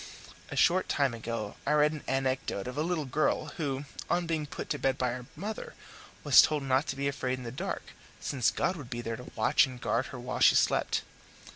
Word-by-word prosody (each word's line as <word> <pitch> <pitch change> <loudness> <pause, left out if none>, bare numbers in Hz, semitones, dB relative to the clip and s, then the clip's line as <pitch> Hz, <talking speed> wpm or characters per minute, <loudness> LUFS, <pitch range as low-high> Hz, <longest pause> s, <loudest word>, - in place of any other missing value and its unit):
A - - -5
short 185 +2 +3
time 140 -4 +2
ago 115 -2 -4
I 150 - +1
read 150 0 +4
an 155 -2 -7
anecdote 130 -6 -1
of 125 +1 -5
a 150 - 0
little 165 -2 -1
girl 145 +4 0
who, 140 -3 -2 0.2
on 175 0 +1
being 160 -3 -1
put - - -6
to - - -1
bed 135 -1 +1
by 125 - +1
her 125 0 -5
mother, 210 +7 -6 0.5
was - - +9
told 150 -2 +1
not 135 +3 +2
to - - -2
be 140 0 -1
afraid 130 -2 -1
in 130 - -8
the 115 - -5
dark, 130 - -4 0.4
since 125 -4 +1
God 185 - 0
would 135 -6 -9
be 120 -1 -4
there 115 -1 -4
to 125 - -10
watch 125 +6 +4
and 130 -1 -9
guard 120 +1 0
her 125 - -8
while 125 +1 -4
she - - +7
slept. - - +2
135 Hz, 225 wpm, -30 LUFS, 125-150 Hz, 0.5 s, was